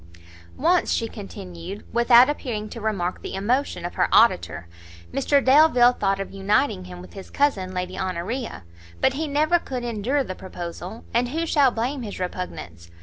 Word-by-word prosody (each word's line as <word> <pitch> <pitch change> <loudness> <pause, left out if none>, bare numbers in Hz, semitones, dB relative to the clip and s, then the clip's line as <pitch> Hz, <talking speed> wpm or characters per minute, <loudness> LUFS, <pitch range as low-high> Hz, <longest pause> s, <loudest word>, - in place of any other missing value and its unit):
"Once," 345 +4 +2
she 230 - 0
continued, 195 -3 -9
without 235 +1 +6
appearing 240 -7 -3
to 230 +2 -8
remark 195 -5 -2
the - - -6
emotion 210 -2 -1
of 175 - -4
her - - +1
auditor, 85 - +3 0.5
"Mr 275 +1 +2
Delvile 260 -3 +6
thought 195 -3 0
of 195 - -5
uniting 195 - 0
him 90 -1 -9
with 90 - -13
his 195 - -10
cousin 205 -11 0
Lady 180 0 -4
Honoria; 190 - -4 0.4
but 265 - +3
he 310 +3 -2
never 305 +4 +2
could 255 -6 -5
endure 240 +5 0
the 190 - -5
proposal; 180 +2 -8
and 240 +1 +1
who 325 +5 -1
shall 285 -4 +4
blame 250 +4 -2
his 210 -5 -6
repugnance? 90 - -6
220 Hz, 165 wpm, -24 LUFS, 185-260 Hz, 0.5 s, without